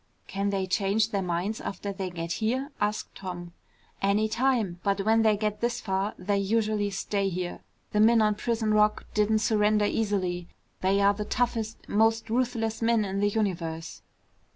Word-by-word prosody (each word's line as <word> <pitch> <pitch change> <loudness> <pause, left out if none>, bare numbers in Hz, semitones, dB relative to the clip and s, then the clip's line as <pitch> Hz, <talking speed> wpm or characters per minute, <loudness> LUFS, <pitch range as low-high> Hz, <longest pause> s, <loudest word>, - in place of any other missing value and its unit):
"Can 200 +1 -2
they 195 -1 0
change 200 +3 +1
their 200 - 0
minds 180 +4 -2
after 200 +1 -4
they 190 -1 -4
get 170 -1 -5
here?" 260 +6 0
asked 210 +1 -1
Tom. 175 -2 -7 0.5
"Any 200 +2 +2
time. 225 -6 0
But 200 0 +1
when 225 +1 +4
they 215 -2 +3
get 210 0 -2
this 240 0 0
far, 195 0 -2
they 200 +2 0
usually 210 0 +1
stay 195 0 -1
here. 180 -1 -4 0.3
The 210 - +1
men 225 +2 +6
on 215 -1 +3
Prison 220 0 -1
Rock 210 0 +3
didn't 215 +1 +2
surrender 210 -1 +3
easily. 185 -5 -1 0.3
They 195 +2 +2
are 200 0 +5
the 210 +1 -4
toughest, 225 -1 -2
most 225 +1 +2
ruthless 230 -2 0
men 225 -2 +3
in 195 0 -2
the 205 0 +3
universe." 170 -6 -3
210 Hz, 170 wpm, -27 LUFS, 195-220 Hz, 0.5 s, men